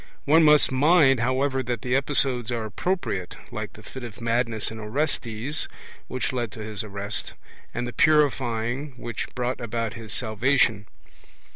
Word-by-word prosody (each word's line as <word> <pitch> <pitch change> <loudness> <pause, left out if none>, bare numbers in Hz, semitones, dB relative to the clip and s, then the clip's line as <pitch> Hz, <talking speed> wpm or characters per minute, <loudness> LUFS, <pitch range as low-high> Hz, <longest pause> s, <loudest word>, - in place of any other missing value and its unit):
One 160 +3 +6
must 150 -2 +6
mind, 140 -1 +5
however, 130 +2 +1
that 120 -1 -3
the 125 0 +1
episodes 135 -3 +2
are 115 -2 -2
appropriate, 110 - -2 0.2
like - - -5
the - - -14
fit 130 - -9
of 115 -2 -8
madness 115 -2 0
in 110 - -7
Orestes, 125 +2 -1 0.4
which 130 +1 -2
led 120 -4 -2
to 110 - -6
his 105 0 -4
arrest, 100 0 -3 0.4
and 125 - -3
the 120 - -6
purifying, 135 -3 +2
which 120 -2 -5
brought 125 0 -2
about 115 -1 -2
his 115 -3 -8
salvation. 110 -1 +2
120 Hz, 150 wpm, -25 LUFS, 110-135 Hz, 0.4 s, One